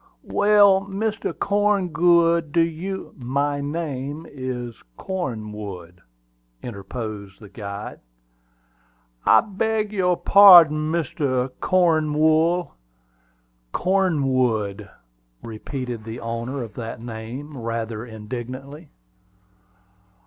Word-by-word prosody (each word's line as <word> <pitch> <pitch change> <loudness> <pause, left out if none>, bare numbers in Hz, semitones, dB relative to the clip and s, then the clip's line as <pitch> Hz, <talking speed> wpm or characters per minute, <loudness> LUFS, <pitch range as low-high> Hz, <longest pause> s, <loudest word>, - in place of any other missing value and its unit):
"Well, 205 -2 +4
Mr. 215 +2 -2
Corngood, 175 -5 +2
do 170 - +3
you 170 +4 -3
" - - -24 0.2
"My 145 0 +1
name 145 0 -4
is 125 -3 -6 0.2
Cornwood," 105 - -6 0.6
interposed 105 -2 -7
the 105 - -13
guide. 100 -1 -7 1.3
"I - - +7
beg 215 +1 -2
your 180 -3 +1
parding, 165 -6 +7
Mr. 140 -6 -1
Cornwool." 160 0 +2 1.0
"Cornwood," 130 - 0 0.5
repeated 120 +1 -6
the 115 +2 -7
owner 115 +3 -4
of 110 -4 -9
that 115 0 -6
name, 120 +6 -8
rather 115 -2 -4
indignantly. 125 +7 -8
140 Hz, 85 wpm, -23 LUFS, 115-175 Hz, 1.3 s, I